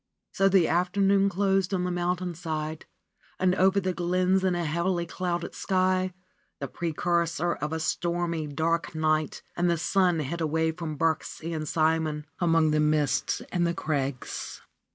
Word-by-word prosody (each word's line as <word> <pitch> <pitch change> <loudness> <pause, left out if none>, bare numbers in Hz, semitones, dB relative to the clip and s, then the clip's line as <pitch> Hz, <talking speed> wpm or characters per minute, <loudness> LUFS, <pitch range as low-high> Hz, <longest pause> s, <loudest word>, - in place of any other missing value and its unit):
So 195 -1 +3
the 190 -3 +4
afternoon 195 +3 +3
closed 195 0 +1
on 180 - -1
the 180 - -1
mountainside 175 -3 -3 0.5
and 185 -1 +3
over 190 +1 +3
the 185 -1 -1
glens 180 +2 +1
in 185 -2 +2
a 175 -1 -1
heavily 170 +3 0
clouded 175 0 -3
sky, 185 0 +1 0.5
the - - -3
precursor 170 +1 0
of 150 +1 -4
a 160 - -2
stormy, 170 -1 -1
dark 165 +3 -1
night, 155 -1 0
and 175 0 +1
the 170 - +2
sun 180 0 +2
hid 165 +4 -4
away 160 +1 +1
from 160 -2 -5
Birksie 165 +1 -1
and 155 -1 -3
Simon 155 -1 +1
among 165 -3 +3
the 155 - +2
mists 150 -1 +1
and 175 -1 +1
the 170 - -1
crags. 140 -6 -3
170 Hz, 155 wpm, -27 LUFS, 160-185 Hz, 0.5 s, the